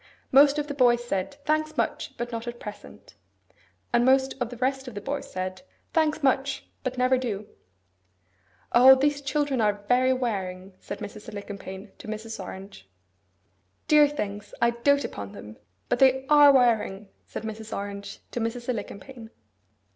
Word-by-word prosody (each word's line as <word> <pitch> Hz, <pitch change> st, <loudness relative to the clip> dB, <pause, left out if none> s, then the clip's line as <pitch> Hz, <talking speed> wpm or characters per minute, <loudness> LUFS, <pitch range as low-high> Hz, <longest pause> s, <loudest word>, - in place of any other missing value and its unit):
Most 280 Hz, +2 st, +6 dB
of 295 Hz, -, 0 dB
the 290 Hz, -, -5 dB
boys 240 Hz, -3 st, +3 dB
said, 195 Hz, +6 st, -2 dB
'Thanks; 310 Hz, 0 st, 0 dB
much! -, -, -2 dB
But 240 Hz, 0 st, -4 dB
not 230 Hz, 0 st, -5 dB
at 240 Hz, 0 st, -6 dB
present.' 210 Hz, -1 st, -10 dB, 0.8 s
And 240 Hz, 0 st, +4 dB
most 265 Hz, +1 st, +4 dB
of 240 Hz, -, 0 dB
the 245 Hz, -, -9 dB
rest 265 Hz, +2 st, -1 dB
of 245 Hz, -, -8 dB
the -, -, -3 dB
boys 280 Hz, +1 st, -4 dB
said, 185 Hz, +2 st, -4 dB, 0.3 s
'Thanks; 310 Hz, -2 st, +1 dB
much! 270 Hz, +1 st, +1 dB, 0.2 s
But 255 Hz, -1 st, -3 dB
never 255 Hz, +1 st, +3 dB
do.' 215 Hz, -5 st, -3 dB, 1.3 s
'O, 260 Hz, +2 st, +9 dB
these 285 Hz, +2 st, +1 dB
children 275 Hz, -2 st, 0 dB
are 205 Hz, -1 st, +1 dB
very 255 Hz, +1 st, +4 dB
wearing!' 195 Hz, -7 st, -3 dB
said -, -, -7 dB
Mrs. 210 Hz, +1 st, -8 dB
Alicumpaine 200 Hz, -1 st, -8 dB
to -, -, -10 dB
Mrs. 215 Hz, -1 st, -5 dB
Orange. 190 Hz, -, -10 dB, 1.0 s
'Dear 300 Hz, -1 st, +7 dB
things! 205 Hz, -8 st, -5 dB
I 235 Hz, 0 st, +4 dB
dote 280 Hz, +4 st, +2 dB
upon 100 Hz, -1 st, -7 dB
them; 105 Hz, +1 st, -10 dB, 0.3 s
but -, -, 0 dB
they 265 Hz, 0 st, +4 dB
ARE 295 Hz, -1 st, +8 dB
wearing,' 225 Hz, -6 st, +2 dB, 0.2 s
said -, -, -6 dB
Mrs. 220 Hz, 0 st, -7 dB
Orange 200 Hz, 0 st, -6 dB
to -, -, -3 dB
Mrs. 235 Hz, +1 st, -3 dB
Alicumpaine. 225 Hz, +1 st, -6 dB
240 Hz, 160 wpm, -26 LUFS, 205-270 Hz, 1.3 s, O